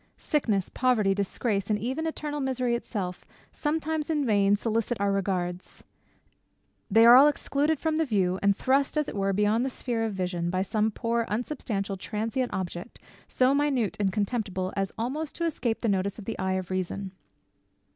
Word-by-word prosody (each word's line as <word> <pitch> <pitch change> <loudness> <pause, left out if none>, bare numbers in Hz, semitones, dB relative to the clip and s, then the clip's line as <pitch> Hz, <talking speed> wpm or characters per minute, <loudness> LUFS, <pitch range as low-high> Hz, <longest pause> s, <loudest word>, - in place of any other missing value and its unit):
Sickness, 215 - 0
poverty, 230 -6 +2
disgrace, 200 +1 -1
and 210 - +2
even 260 +9 -2
eternal 300 -2 -3
misery 255 -3 0
itself, 195 -6 -4 0.3
sometimes 315 0 -2
in 300 -3 +1
vain 205 -3 +4
solicit 225 +2 -1
our 200 0 +1
regards; 185 -2 -2 1.1
they 225 +3 +6
are 240 +1 +10
all 275 +3 +9
excluded 295 +1 0
from 320 -1 0
the 320 - +3
view, 190 -7 +1
and 200 0 +3
thrust 270 +6 +1
as 300 - +1
it - - -6
were 195 0 +1
beyond 210 +4 +2
the 265 - 0
sphere 240 -3 -2
of 220 -3 -2
vision, 180 -2 -2
by 185 +1 0
some 215 +2 +1
poor 230 +1 -1
unsubstantial 210 -4 -3
transient 225 +6 -2
object, 180 +3 -5 0.3
so 255 +1 +3
minute 280 -7 +1
and 195 -2 +1
contemptible 200 -3 -2
as 195 -1 -1
almost 280 +7 -3
to 335 - -1
escape 245 -8 -1
the - - 0
notice 195 -1 0
of 215 - -9
the 225 - -5
eye 190 -1 0
of 185 -1 -3
reason. 185 +1 -3
220 Hz, 175 wpm, -27 LUFS, 195-260 Hz, 1.1 s, are